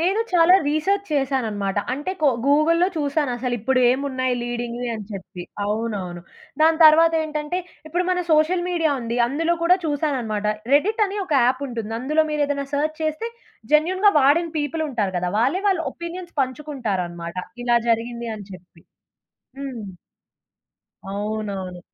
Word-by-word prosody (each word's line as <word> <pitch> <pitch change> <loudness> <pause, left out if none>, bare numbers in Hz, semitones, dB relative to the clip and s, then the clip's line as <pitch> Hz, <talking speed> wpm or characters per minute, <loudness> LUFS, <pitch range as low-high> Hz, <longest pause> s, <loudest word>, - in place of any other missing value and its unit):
నేను 385 +6 +2
చాలా 350 +1 +6
రీసెర్చ్ 385 +7 0
చేశాననమాట. 225 -8 -1
అంటే, 290 +8 -3
కో 300 - +4 0.2
గూగుల్‌లో 315 +5 +4
చూశాను 290 -1 0
అసలు 250 0 -2
ఇప్పుడు 255 +4 +1
ఏమున్నాయి 255 -1 0
లీడింగ్‌వి 240 0 -4
అని 215 - -6
చెప్పి. 185 -2 -8 0.2
అవునవును. 205 -5 -3 0.4
దాని 320 0 +5
తర్వాతేంటంటే, 315 0 +4 0.3
ఇప్పుడు 350 +3 -1
మన 360 0 +1
సోషల్ 315 +3 +3
మీడియా 330 -4 +1
ఉంది 235 0 -3
అందులో 325 +7 0
కూడా 360 +2 +5
చూశాననమాట. 265 -9 -1 0.3
రెడ్డిట్ 420 +10 +3
అని 400 +2 -5
ఒక 330 - -5
యాప్ 255 +2 +1
ఉంటుంది. 225 -2 -5
అందులో 305 +5 +1
మీరు 300 -1 +1
ఏదైనా 280 -1 -2
సెర్చ్ 310 +2 0
చేస్తే, 310 +9 -2 0.4
జెన్యూన్‌గా 370 +7 +4
వాడిన 315 +5 +4
పీపుల్ 300 +2 -2
ఉంటారు 210 -8 -2
గదా! 180 0 -1
వాళ్ళే 275 - +1
వాళ్ళు 365 -4 +1
ఒపీనియన్స్ 345 +1 -7
పంచుకుంటారనమాట. 205 - -4 0.3
"ఇలా 240 -1 +4
జరిగింది" 235 +1 -1
అని 205 -2 -9
జెప్పి. 180 -2 -15 0.8
హ్మ్. 240 -8 -6 1.2
అవునవును. 200 -3 -4
280 Hz, 135 wpm, -22 LUFS, 225-320 Hz, 1.2 s, చాలా